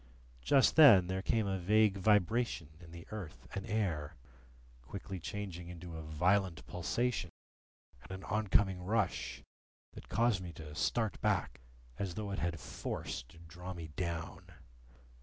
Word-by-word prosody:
Just 135 - +4
then 120 - +9
there 95 +1 -2
came 110 +2 +1
a 95 -1 -1
vague 105 +2 +4
vibration 105 -3 +2
in 85 -2 -13
the 85 0 -10
earth 100 -8 -7
and 95 - -4
air, 80 -8 -1 0.7
quickly 95 +8 -7
changing 90 -1 -5
into 85 -1 -8
a 80 - -5
violent 90 +4 +1
pulsation, 105 +3 -1 0.7
and - - -13
an 95 0 -6
oncoming 100 -3 +2
rush 105 0 -1 0.5
that - - -12
caused 115 -2 +2
me 85 -2 -7
to 80 -2 -9
start 110 +7 0
back, 100 - 0 0.4
as 95 -3 -2
though 105 -2 -4
it 100 - -2
had 85 -1 -1
force - - -4
to 80 - -17
draw 90 +2 -8
me 80 -2 -7
down. 85 +1 -4
95 Hz, 145 wpm, -34 LUFS, 85-105 Hz, 0.7 s, then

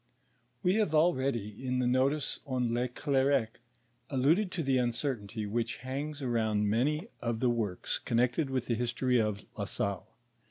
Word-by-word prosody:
We 185 +4 +3
have 205 -8 +2
already 130 - +1
in 130 -1 0
the 125 - +1
notice 130 +4 +1
on 125 -3 0
Le 120 +1 +1
Clercq 135 -2 +2 0.6
alluded 155 +9 +2
to 165 - -1
the 135 -2 +2
uncertainty 120 -3 -2
which 115 +2 -1
hangs 145 +2 -4
around 110 -4 +1
many 150 - +1
of 115 -1 -1
the 125 0 +3
works 105 -6 -2
connected 125 +5 +1
with 130 -2 -1
tlie 115 - 0
history 125 +1 +1
of 105 -2 -2
La - - -3
Salle. 100 -2 -2
125 Hz, 155 wpm, -31 LUFS, 115-140 Hz, 0.6 s, We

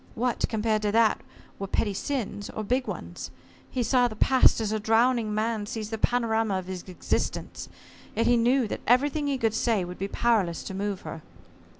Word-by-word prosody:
What, 245 +1 -1
compared 215 -1 0
to 210 -1 0
that, 225 -1 +3 0.4
were 195 - -3
petty 205 +1 0
sins, 205 -3 -3
or 215 - -5
big 250 +5 0
ones? - - -6 0.4
He 250 - -1
saw 245 +1 +3
the 215 - -7
past 260 +3 +4
as 215 -2 -1
a 215 - 0
drowning 225 +1 +2
man 215 0 -1
sees 220 -2 -5
the 225 - -3
panorama 225 -4 +1
of 185 - -5
his 185 -1 -5
existence. 180 - -3 0.5
Yet 230 - +1
he 240 - +4
knew 240 +1 +3
that - - -5
everything 285 +4 +3
he 280 -1 0
could 225 -3 +1
say 225 -4 +1
would 180 +1 -8
be 195 - -2
powerless 200 -7 +1
to - - -6
move 200 0 -3
her. 160 - -7
225 Hz, 195 wpm, -27 LUFS, 205-245 Hz, 0.5 s, past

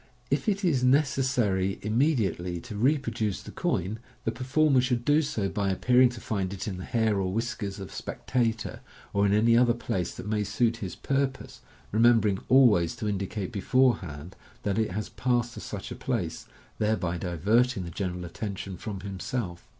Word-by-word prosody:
If 140 +9 +1
it 200 -1 0
is 135 -8 +2
neces 135 +1 +3
sary 100 -7 +1
immediately 105 - +1
to 105 - -8
reproduce 115 -4 0
the - - -9
coin, 105 +6 -1 0.2
the 115 - 0
performer 130 +2 +2
should 125 -2 -1
do 150 +2 +4
so 115 -10 -1
by 100 0 -1
appearing 125 +6 +4
to 120 -1 -8
find 95 -5 -2
it 95 - -5
in 95 -3 -3
the 90 - -6
hair 110 -3 +1
or 95 -1 -1
whiskers 105 -2 -3
of 95 - -7
a - - -12
spectator, 115 -3 -2 0.3
or 100 0 +3
in - - +2
any 115 +2 +4
other 120 0 +4
place 95 -7 -2
that - - -8
may 105 0 0
suit 115 +3 +1
his 95 -5 -5
purpose, 135 -1 -2 0.3
remembering 110 -3 +4
always 110 -11 +5
to 110 - -4
indicate 100 0 -3
beforehand 100 - +1 0.3
that 100 +1 0
it 110 - +1
has 105 +3 -3
passed 120 -2 0
to - - -8
such 100 -2 -6
a - - -4
place, 105 -11 -3 0.3
thereby 100 -5 0
divert 105 - +2
ing 95 - -2
the 85 - -7
general 90 0 -3
attention 95 +1 -5
from 100 -3 -6
himself. 95 -1 -5
110 Hz, 180 wpm, -28 LUFS, 95-125 Hz, 0.3 s, always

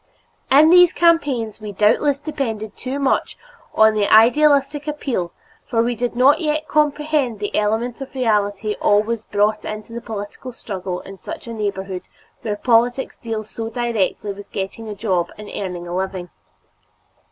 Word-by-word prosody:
In 300 +4 +6
these 355 -1 +7
campaigns 280 -11 +1
we 210 -1 -6
doubtless 270 +8 +2
depended 235 -9 -4
too 260 +2 -4
much 275 -2 0 0.3
upon 220 0 +5
the 210 -1 0
idealistic 285 +5 +4
appeal 265 - -2 0.4
for 230 -4 +1
we 240 +1 0
did 240 +1 -3
not 260 +4 +5
yet 310 0 -1
comprehend 300 -4 +1
the 205 0 -4
element 225 +4 0
of 270 - -8
reality 210 -3 0
always 215 +2 +2
brought 210 +1 +1
into 215 +2 -7
the 235 - -5
political 220 +3 -7
struggle 190 -6 -5
in 195 0 -11
such - - -8
a 230 - -6
neighborhood 195 -3 -3 0.4
where 210 -2 -2
politics 240 +4 +1
deal 225 -2 -4
so 225 +1 -6
directly 225 -4 -1
with 200 +1 -12
getting 200 +3 -5
a 210 - -5
job 185 -5 0
and 210 0 -9
earning 180 -3 -5
a 175 - -4
living. 185 -1 -4
225 Hz, 155 wpm, -20 LUFS, 205-265 Hz, 0.4 s, these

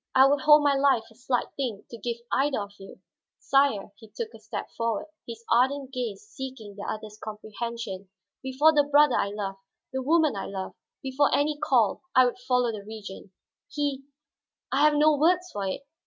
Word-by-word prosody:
I 265 0 +8
would 280 0 +3
hold 300 +1 +7
my 285 -1 +4
life 270 -4 +3
a - - -19
slight 245 +1 -2
thing 245 -7 -4
to 235 - -7
give 235 +2 -3
either 275 -1 +1
of 200 -1 -6
you. 195 - -12 0.4
Sire," 270 -8 +2
he 220 -2 -15
took 450 - -6
a - - -12
step - - -6
forward, 230 -2 -1 0.2
his 230 -1 -8
ardent 265 +2 +2
gaze 235 -7 -4
seeking 245 -4 -8
the 205 - -7
other's 215 0 -8
comprehension, 215 -2 -6 0.3
"before 275 +4 +3
the 295 -1 +4
brother 290 -2 +5
I - - +1
loved, 200 -1 -5 0.3
the 265 - -1
woman 310 -2 +3
I 195 - -4
love, 190 -1 -5 0.3
before 270 +2 +2
any 295 +1 +2
call, 245 -7 +2
I 255 - +7
would 245 - -2
follow 250 -1 +1
the 210 -2 -7
Regent. 210 -2 -9 0.4
He 285 -3 -2 0.7
I 275 - +2
have 300 0 +5
no 300 +1 +5
words 355 +5 +2
for 200 -1 -3
it. 190 +9 -4
250 Hz, 185 wpm, -27 LUFS, 215-285 Hz, 0.7 s, I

